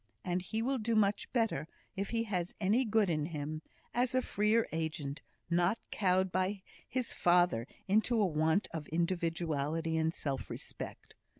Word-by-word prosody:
And 180 0 0
he 220 +5 -2
will 265 +1 +1
do 225 +1 0
much 205 -1 +2
better, 225 - +1 0.3
if 195 +1 -2
he 230 -1 +1
has 185 -5 -2
any 215 +6 +3
good 220 -2 +3
in 155 -3 0
him, 155 -1 -4 0.3
as 250 +1 +1
a 255 - +3
freer 215 +3 +2
agent, 155 -3 -3 0.3
not 175 +5 +2
cowed 185 -1 +2
by 185 +2 0 0.3
his 255 -1 -1
father 175 -9 +3 0.2
into 220 +4 +3
a 210 - +5
want 160 +3 +2
of 155 -3 -5
individuality 165 -2 0
and 160 0 +2
self 140 -5 -3
respect. - - -8
180 Hz, 160 wpm, -33 LUFS, 160-215 Hz, 0.3 s, a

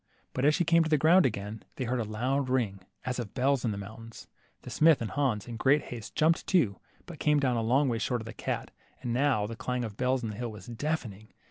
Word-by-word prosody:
But 130 - 0
as 150 +1 +5
she 175 - +1
came 165 0 +5
to 160 - -2
the 155 - +4
ground 165 +3 +5
again, 105 -1 -5
they 130 - -3
heard 125 +1 -1
a - - 0
loud 130 +6 -1
ring 115 -7 0 0.3
as 125 0 -2
of 110 -5 -6
bells 135 0 +2
in 115 - +1
the 100 - -3
mountain. 110 +3 -9 0.5
The - - -8
smith 160 -1 +5
and 115 - -4
Hans, 130 -9 0
in 120 -1 -6
great 135 +5 +3
haste, 115 -3 -8
jumped 165 +1 +2
too, 125 - +2 0.3
but 170 -4 -10
came 150 -1 +3
down 130 -3 +1
a 115 - 0
long 130 +6 +3
way 115 -3 0
short 125 +1 0
of - - -9
the 115 - -7
cat, - - -4 0.3
and 120 - -1
now 130 -5 +2
the 115 +2 -6
clang 125 +2 -2
of 105 -2 -8
bells 130 0 +1
in 110 - -2
the 105 - -8
hill 120 -1 -3
was 105 -4 -11
deafening. 120 -5 -4
125 Hz, 255 wpm, -29 LUFS, 110-140 Hz, 0.5 s, as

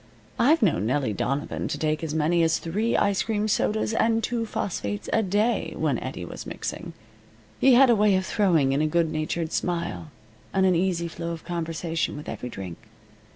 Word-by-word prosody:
I've 295 +5 +4
known 110 - +2
Nellie 130 -3 0
Donovan 135 +8 -2
to - - -3
take 155 0 -1
as 155 -1 -3
many 160 +2 +2
as 165 -1 +3
three 210 +8 -1
ice 200 -1 +2
cream 215 -1 -1
sodas 215 +1 0
and 225 0 +2
two 235 -2 -1
phosphates 105 - -3
a 225 - +4
day 210 +4 0
when - - 0
Eddie - - -6
was - - -8
mixing. - - -5 0.7
He 265 -2 +6
had 260 0 +7
a - - +5
way 210 -2 +4
of 185 0 0
throwing 170 -12 +2
in 140 - +1
a 155 - +2
good 165 0 +1
natured 160 +1 -2
smile, 170 -2 -2 0.5
and 190 0 +4
an 185 - +4
easy 170 -1 0
flow 170 0 -5
of 165 - -9
conversation 165 -2 -2
with 150 - -9
every 125 - -5
drink. 95 -6 -7
170 Hz, 190 wpm, -25 LUFS, 155-210 Hz, 0.7 s, had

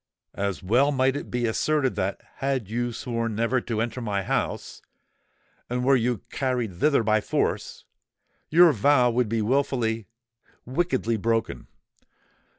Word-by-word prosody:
"As 100 -2 -3
well 125 +9 +3
might 130 -1 +2
it 145 - -5
be 120 -1 -1
asserted 135 +4 +1
that, 95 +1 -2 0.2
had 135 -6 -1
you 120 +3 -2
sworn 115 -1 -3
never 115 +3 +1
to 115 -2 -3
enter 120 +2 -2
my 100 -4 -2
house, - - -3 0.9
and 125 +1 -1
were 135 +1 +5
you 120 -3 0
carried 125 -6 -1
thither 145 -6 +3
by 110 0 +2
force, - - -2 0.6
your 170 +1 +7
vow 125 0 +3
would 120 -1 0
be 115 -1 0
wilfully—wickedly 115 - -2
broken. 115 +2 -1
120 Hz, 135 wpm, -25 LUFS, 110-130 Hz, 0.9 s, your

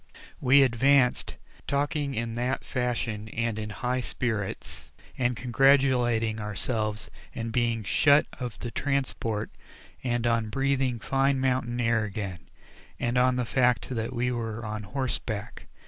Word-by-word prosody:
We 135 +2 +6
advanced, 130 +1 +3 0.3
talking 145 0 0
in 115 0 -2
that 125 +3 -2
fashion 120 -4 -2
and 115 -1 -2
in 105 0 -4
high 125 +4 -2
spirits, 110 -6 -4 0.3
and 125 -2 0
congratulating 125 -4 +3
ourselves 105 +1 -3 0.2
in 115 -1 -4
being 115 -2 0
shut 145 +8 +4
of 125 -4 -5
the 120 - -6
transport 130 -7 -2 0.5
and 120 -2 0
on 115 -2 +1
breathing 135 0 +1
fine 135 +3 +1
mountain 125 -2 0
air 115 -2 +2
again, 100 -4 -4 0.6
and 120 +1 -1
on 125 0 +4
the 125 -1 0
fact 125 0 +2
that 115 -3 -2
we 125 +1 0
were 115 -1 -4
on 105 0 -4
horseback. 110 -2 -4
120 Hz, 130 wpm, -27 LUFS, 110-130 Hz, 0.6 s, We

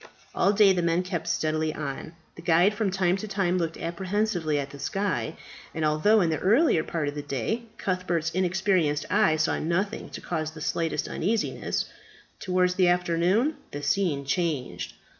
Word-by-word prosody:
All 200 - +3
day 205 -2 +5
the 180 - 0
men 170 +1 +1
kept 180 -3 -4
steadily 155 0 0
on. 150 +2 -5 0.2
The - - -10
guide 175 +4 +4
from 210 -1 0
time 185 -1 +1
to 215 - -6
time 190 -3 0
looked 165 -1 -2
apprehensively 175 -2 -1
at 140 -1 -3
the 140 - -10
sky; 185 +1 -2 0.4
and 160 -1 0
although 180 +9 +4
in 170 -3 +2
the 155 - -1
earlier 215 - +3
part 160 -4 -2
of 145 - -2
the 145 - -4
day 145 - -3
Cuthbert's 180 -4 -1
inexperienced 185 -4 +1
eye 155 - +4
saw 155 0 0
nothing 195 +7 -1
to - - -7
cause 155 -3 -3
the 160 0 -11
slightest 165 +1 -1
uneasiness, 215 +5 -1 0.5
towards 180 -1 +1
the 180 -1 +3
afternoon 180 - +2
the 145 0 -7
scene 145 -2 0
changed. 155 -4 -2
175 Hz, 170 wpm, -26 LUFS, 155-195 Hz, 0.5 s, day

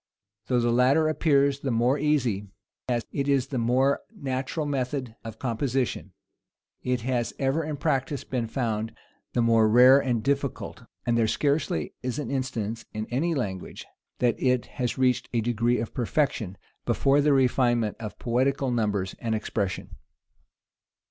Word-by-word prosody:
Though 125 -2 +2
the 120 0 +2
latter 130 +6 +4
appears 140 -3 +2
the 140 - -3
more 125 +4 +2
easy, 130 -9 +1 0.4
as 120 -2 0
it 140 -1 -2
is 140 -3 +2
the 130 - -2
more 130 +4 +2
natural 140 - -3
method 130 -3 -2
of 110 -1 -8
composition, 125 +1 -2 0.7
it 125 -1 -1
has 120 -1 -1
ever 135 +4 0
in 150 -1 -4
practice 140 -1 -1
been 120 -3 -2
found 110 -2 -2 0.4
the 120 - +2
more 115 -1 +4
rare 125 +4 +8
and 120 -5 -1
difficult; 140 -1 -2 0.2
and 120 - +2
there 115 - +3
scarcely 140 - 0
is 125 +1 -3
an 150 - -4
instance, 115 -5 -3
in 110 0 -3
any 160 +7 0
language, 95 -9 -4 0.3
that 120 -2 +1
it 125 -2 +2 0.2
has 120 -1 -1
reached 130 -1 +1
a 120 - +2
degree 120 +1 +1
of 115 - -4
perfection, 120 -6 -1 0.3
before 140 +1 +3
the 150 +1 +3
refinement 120 -4 +2
of 105 -2 -7
poetical 130 +2 0
numbers 105 -5 0
and 115 -2 -1
expression. 100 -3 -3
125 Hz, 150 wpm, -26 LUFS, 115-140 Hz, 0.7 s, rare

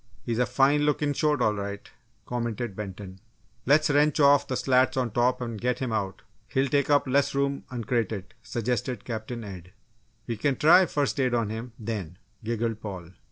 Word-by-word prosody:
"He's 115 0 -2
a 125 - +2
fine 140 +6 +3
looking 150 0 +1
shoat, 150 +1 +1
all 110 - +3
right," 100 0 -5 0.4
commented 120 -3 -3
Benton. 95 -2 -7 0.5
"Let's 150 +3 +5
wrench 150 +1 +3
off 145 -1 +5
the 130 - -2
slats 130 0 +2
on 125 -3 0
top 125 +3 +1
and 115 -3 -5
get 125 0 0
him 130 -2 -3
out 105 -1 -3 0.2
He'll 135 +2 0
take 140 +1 +1
up 145 -1 +4
less 135 +1 +2
room 140 0 -1
uncrated," 115 -4 -2
suggested 120 0 -3
Captain 115 0 -5
Ed. 90 -3 -10 0.5
"We 115 -2 -3
can 135 +5 +1
try 175 +6 +6
'first 145 -2 -1
aid' 130 -2 +2
on 115 -3 0
him, 115 +2 -6
then," 105 -7 -5 0.3
giggled 115 -1 -2
Paul. 90 -5 -7
120 Hz, 175 wpm, -27 LUFS, 110-140 Hz, 0.5 s, try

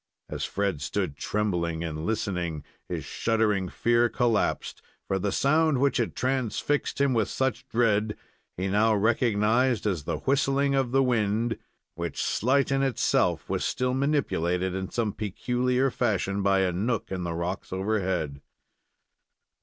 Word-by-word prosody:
As - - -3
Fred 100 -7 -1
stood 70 +1 -2
trembling 85 -3 -1
and 80 -1 -4
listening, 90 -8 -2 0.3
his - - -4
shuddering 105 -5 0
fear 120 0 +2
collapsed; 120 -3 0 0.3
for 95 - 0
the 100 +1 -1
sound 155 +3 +3
which 140 +2 +2
had 120 -3 -1
transfixed 130 +3 -1
him 140 -2 +3
with 110 -3 +1
such 130 -1 -1
dread, 110 -2 +1 0.4
he 95 +2 -1
now 105 +3 +3
recognized 115 +2 +2
as 90 -8 -1
the - - -1
whistling 140 0 +1
of 135 -3 +1
the 135 +1 +4
wind, 115 -1 0 0.3
which, 85 -2 -5
slight 135 +4 +1
in 135 0 +2
itself, 135 -3 +1
was - - -1
still 125 0 0
manipulated 95 - 0
in 95 0 -3
some 110 -4 -1
peculiar 125 +5 0
fashion 100 -5 0
by 95 0 +3
a 95 -1 +2
nook 105 +6 -2
in 95 -1 -2
the 85 -1 -3
rocks 85 +3 -4
overhead. 95 -7 -1
110 Hz, 145 wpm, -27 LUFS, 95-125 Hz, 0.4 s, the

